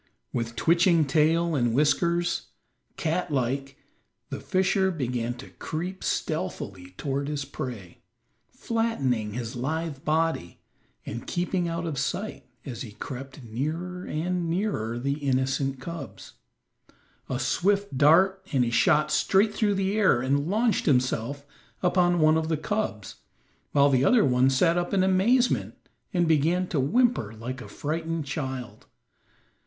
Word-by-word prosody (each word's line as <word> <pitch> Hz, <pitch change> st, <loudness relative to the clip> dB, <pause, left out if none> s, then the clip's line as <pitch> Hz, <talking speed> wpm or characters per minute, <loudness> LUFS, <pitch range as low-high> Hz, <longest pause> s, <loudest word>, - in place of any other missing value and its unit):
With 115 Hz, -1 st, -2 dB
twitching 170 Hz, -1 st, +4 dB
tail 160 Hz, +4 st, +2 dB
and 120 Hz, -5 st, +1 dB
whiskers, 170 Hz, -, +1 dB, 0.5 s
cat 170 Hz, +3 st, -1 dB
like, 135 Hz, 0 st, -2 dB, 0.5 s
the -, -, -4 dB
fisher 190 Hz, +1 st, +1 dB
began 125 Hz, -7 st, -2 dB
to 125 Hz, -, -11 dB
creep 180 Hz, +4 st, -5 dB
stealthily 90 Hz, -2 st, -3 dB
toward 140 Hz, 0 st, -2 dB
his 145 Hz, -2 st, -3 dB
prey, 125 Hz, -, -7 dB, 0.5 s
flattening 135 Hz, -, -1 dB
his 120 Hz, +1 st, -5 dB
lithe 150 Hz, +3 st, -3 dB
body 160 Hz, -, 0 dB, 0.5 s
and 120 Hz, +2 st, -6 dB
keeping 175 Hz, 0 st, -1 dB
out 170 Hz, 0 st, -3 dB
of 150 Hz, -5 st, -3 dB
sight 200 Hz, +9 st, -3 dB, 0.2 s
as 120 Hz, -4 st, -6 dB
he 110 Hz, -5 st, -7 dB
crept 135 Hz, +3 st, -8 dB
nearer 160 Hz, +10 st, -4 dB
and 175 Hz, +2 st, -2 dB
nearer 165 Hz, -, -1 dB
the 140 Hz, +4 st, -2 dB
innocent 135 Hz, 0 st, 0 dB
cubs. 140 Hz, -, -8 dB, 1.0 s
A 130 Hz, -, -1 dB
swift 200 Hz, +8 st, +1 dB
dart, 185 Hz, +7 st, +4 dB
and 130 Hz, -3 st, +3 dB
he 120 Hz, -, -2 dB
shot 150 Hz, +5 st, +3 dB
straight 195 Hz, +7 st, +3 dB
through 205 Hz, -2 st, +1 dB
the 195 Hz, +1 st, 0 dB
air 205 Hz, -, +4 dB
and 140 Hz, +5 st, 0 dB
launched 220 Hz, +1 st, +1 dB
himself 130 Hz, 0 st, +1 dB, 0.4 s
upon 175 Hz, -1 st, +3 dB
one 155 Hz, 0 st, +5 dB
of 160 Hz, -, -3 dB
the 160 Hz, -1 st, 0 dB
cubs, 160 Hz, -, -3 dB, 0.5 s
while 140 Hz, 0 st, +4 dB
the 130 Hz, -1 st, +3 dB
other 235 Hz, -, +5 dB
one 130 Hz, 0 st, +4 dB
sat 165 Hz, +6 st, +3 dB
up 175 Hz, +3 st, -2 dB
in 190 Hz, -, +3 dB
amazement 215 Hz, +7 st, +2 dB, 0.4 s
and 175 Hz, -3 st, +1 dB
began 165 Hz, +4 st, +2 dB
to 155 Hz, -, 0 dB
whimper 145 Hz, -, +2 dB
like 125 Hz, +4 st, -6 dB
a -, -, -9 dB
frightened 160 Hz, +1 st, -3 dB
child. 130 Hz, -4 st, -5 dB
150 Hz, 140 wpm, -26 LUFS, 130-175 Hz, 1.0 s, one